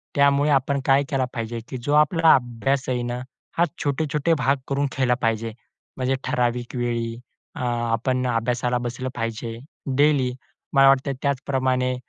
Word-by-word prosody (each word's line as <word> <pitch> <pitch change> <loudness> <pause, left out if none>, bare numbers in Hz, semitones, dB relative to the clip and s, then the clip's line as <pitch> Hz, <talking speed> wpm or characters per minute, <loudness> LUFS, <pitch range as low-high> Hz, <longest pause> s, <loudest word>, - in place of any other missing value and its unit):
त्यामुळे 140 +1 +4
आपण 140 0 +2
काय 135 +1 +4
केलं 135 -2 +1
पाहिजे? 115 -1 -4
की 130 - -4
जो 135 +4 -2
आपला 160 +2 +5
अभ्यास 130 +2 -1
आहे 125 -1 0
ना, 120 0 -3 0.4
हा 170 - +5 0.2
छोटे-छोटे 150 +2 0
भाग 135 +3 +2
करून 140 +1 0
केला 130 -2 +3
पाहिजे, 115 -1 0 0.4
म्हणजे 130 +1 0
ठराविक 120 0 -1
वेळी 115 -1 -1 0.4
अ, - - -5
आपण 120 +1 0
अभ्यासाला 120 +1 0
बसलं 130 +2 -4
पाहिजे, 115 0 -4 0.4
डेली. 140 -4 +3 0.4
मला 135 0 +6
वाटतं, 135 +1 +3
त्याचप्रमाणे 130 -2 0
130 Hz, 145 wpm, -23 LUFS, 120-140 Hz, 0.4 s, मला